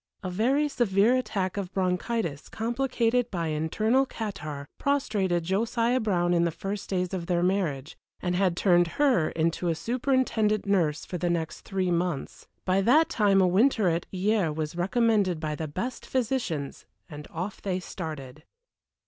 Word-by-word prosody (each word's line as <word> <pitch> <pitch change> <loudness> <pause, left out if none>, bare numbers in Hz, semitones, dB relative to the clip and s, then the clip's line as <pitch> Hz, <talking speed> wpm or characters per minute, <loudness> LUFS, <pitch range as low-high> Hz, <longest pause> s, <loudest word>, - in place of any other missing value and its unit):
A 185 - -3
very 260 +10 +2
severe 230 -3 +3
attack 195 -7 -2
of 195 -2 -3
bronchitis, 180 -3 -1
complicated 240 0 0
by 170 -5 -2
internal 215 - +1
catarrh, 155 - -6
prostrated 205 -11 0
Josiah 230 +7 +1
Brown 175 -6 +1
in 170 -1 +3
the 170 - +2
first 195 +5 -5
days 180 -1 -1
of 175 -3 -3
their 175 -1 +1
marriage, 170 -7 -1 0.2
and 180 -1 -1
had 180 -1 +1
turned 175 -2 +4
her 265 - +3
into 165 +2 -1
a 165 - +1
superintendent 235 - 0
nurse 170 -7 +1
for 180 - -5
the 175 0 0
next 165 -2 -2
three 190 -2 -1
months; 170 -4 -2 0.2
by 185 +1 +2
that 290 +10 +4
time 200 -3 +3
a 185 - +4
winter 210 +1 +3
at 170 0 -1
Hyères 190 -4 +1
was 155 0 -3
recommended 195 -1 +2
by 155 -1 -2
the 155 +1 -4
best 185 - -5
physicians, 225 - -2 0.2
and 150 -1 -9
off 180 +5 -5
they 185 -2 -1
started. 155 -6 -7
190 Hz, 155 wpm, -27 LUFS, 170-225 Hz, 0.2 s, turned